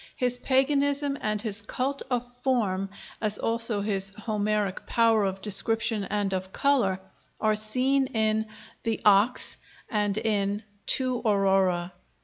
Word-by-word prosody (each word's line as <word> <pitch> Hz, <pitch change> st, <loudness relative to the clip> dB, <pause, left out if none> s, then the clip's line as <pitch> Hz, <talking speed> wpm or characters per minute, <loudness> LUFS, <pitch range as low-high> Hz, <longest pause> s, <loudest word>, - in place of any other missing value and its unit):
His 245 Hz, -1 st, 0 dB
paganism 280 Hz, +2 st, +1 dB
and 215 Hz, 0 st, -1 dB
his 210 Hz, -1 st, +1 dB
"cult 265 Hz, +6 st, -2 dB
of 245 Hz, -1 st, 0 dB, 0.2 s
form," 205 Hz, -7 st, 0 dB, 0.3 s
as 210 Hz, -1 st, 0 dB
also 230 Hz, -2 st, +1 dB
his 195 Hz, -2 st, 0 dB
Homeric 210 Hz, -2 st, -1 dB
power 230 Hz, -2 st, +3 dB
of 190 Hz, 0 st, -3 dB
description 220 Hz, +1 st, 0 dB
and 205 Hz, -1 st, -1 dB
of 185 Hz, 0 st, -3 dB
color, 235 Hz, -10 st, +2 dB, 0.4 s
are 215 Hz, -1 st, +2 dB
seen 255 Hz, +6 st, +1 dB
in 220 Hz, -2 st, 0 dB, 0.3 s
'The 225 Hz, -1 st, -1 dB
Ox' 210 Hz, +4 st, +3 dB, 0.3 s
and 210 Hz, -2 st, 0 dB
in 205 Hz, -1 st, 0 dB, 0.2 s
'To 255 Hz, -2 st, +2 dB
Aurora.' 190 Hz, -4 st, +2 dB
215 Hz, 125 wpm, -27 LUFS, 200-245 Hz, 0.4 s, power